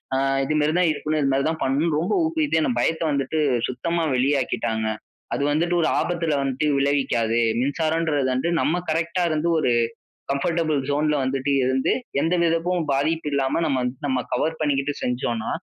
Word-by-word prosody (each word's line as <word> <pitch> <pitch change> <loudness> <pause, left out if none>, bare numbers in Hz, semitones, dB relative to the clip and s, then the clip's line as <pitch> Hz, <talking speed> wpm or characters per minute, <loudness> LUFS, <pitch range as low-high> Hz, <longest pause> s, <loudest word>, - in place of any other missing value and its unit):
அ - - +2 0.3
இதுமாரி 150 +1 +1
தான் 180 -2 +3
இருக்கணும், 155 +1 -2
இதுமாரி 135 0 +1
தான் 160 0 -4
பண்ணனும் 150 +4 +1
ரொம்ப 170 - -1
ஊக்குவித்து 320 -2 +1
என் 255 -7 0
பயத்த 160 - 0
வந்துட்டு 140 +2 -1 0.3
சுத்தமா 170 +7 -2
வெளியாக்கிட்டாங்க. 125 -4 0 0.5
அது - - -1
வந்துட்டு, 170 +4 +1
ஒரு 160 - +2
ஆபத்துல 165 -3 -1
வந்துட்டு 135 +2 -1
விளைவிக்காது. 130 -5 +1 0.2
மின்சாரன்றது 155 +1 0
வந்து 130 +7 0
நம்ம 175 +3 +1
கரெக்ட்‌டா 165 +3 0
இருந்து 155 +1 0
ஒரு 130 - +1 0.6
கம்ஃபர்டபிள் 155 +1 0
ஜோன்ல 150 +1 +1
வந்துட்டு 135 +1 -1
இருந்து, 130 +1 +1 0.3
எந்த 165 +4 +1
விதக்கும் 165 0 0
பாதிப்பு 155 +3 0
இல்லாம 140 +3 +1
நம்ம 130 -2 0 0.2
நம்ம 130 -2 0
கவர் 160 +6 0
பண்ணிக்கிட்டு 145 -1 0
செஞ்சோன்னா, 120 -2 -2
150 Hz, 150 wpm, -23 LUFS, 135-165 Hz, 0.6 s, தான்